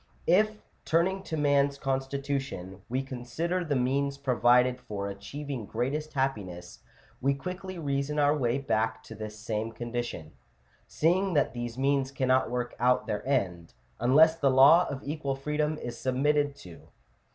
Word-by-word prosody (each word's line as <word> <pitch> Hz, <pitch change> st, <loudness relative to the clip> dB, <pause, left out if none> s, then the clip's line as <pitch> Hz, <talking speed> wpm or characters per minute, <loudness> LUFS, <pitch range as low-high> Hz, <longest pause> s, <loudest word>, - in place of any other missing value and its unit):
III.). 170 Hz, -, +5 dB
If, 215 Hz, +2 st, +1 dB, 0.2 s
turning 185 Hz, +4 st, +1 dB
to 160 Hz, -, -3 dB
man's 140 Hz, -1 st, +2 dB
constitution, 135 Hz, -8 st, -3 dB
we 130 Hz, +3 st, -1 dB
consider 135 Hz, +8 st, -3 dB
the 150 Hz, -4 st, -1 dB
means 140 Hz, +2 st, 0 dB
provided 125 Hz, -1 st, +3 dB
for 100 Hz, -3 st, -5 dB
achieving 120 Hz, +4 st, -6 dB
greatest 140 Hz, +8 st, -2 dB
happiness, 100 Hz, -, -3 dB, 0.4 s
we 140 Hz, +1 st, +2 dB
quickly 180 Hz, +6 st, -6 dB
reason 140 Hz, -1 st, -2 dB
our 145 Hz, 0 st, +4 dB
way 125 Hz, -3 st, +1 dB
back 110 Hz, -5 st, -1 dB
to -, -, -10 dB
this 110 Hz, 0 st, -7 dB
same 110 Hz, +1 st, -3 dB
condition; 120 Hz, -8 st, -5 dB, 0.6 s
seeing 180 Hz, +3 st, +1 dB
that 145 Hz, -, +2 dB
these 120 Hz, -1 st, -5 dB
means 135 Hz, 0 st, +1 dB
cannot 130 Hz, -2 st, +1 dB
work 125 Hz, 0 st, -3 dB
out 125 Hz, +1 st, +3 dB
their 105 Hz, -, -3 dB
end, 90 Hz, -11 st, -1 dB, 0.2 s
unless 155 Hz, +6 st, +5 dB
the 140 Hz, -, +3 dB
law 140 Hz, +7 st, +7 dB
of 135 Hz, 0 st, -5 dB
equal 145 Hz, -2 st, -3 dB
freedom 150 Hz, +2 st, -1 dB
is 120 Hz, -5 st, -6 dB
submitted 145 Hz, +2 st, +1 dB
to 90 Hz, -10 st, -12 dB
(Chap. -, -, -20 dB
135 Hz, 150 wpm, -28 LUFS, 120-150 Hz, 0.6 s, law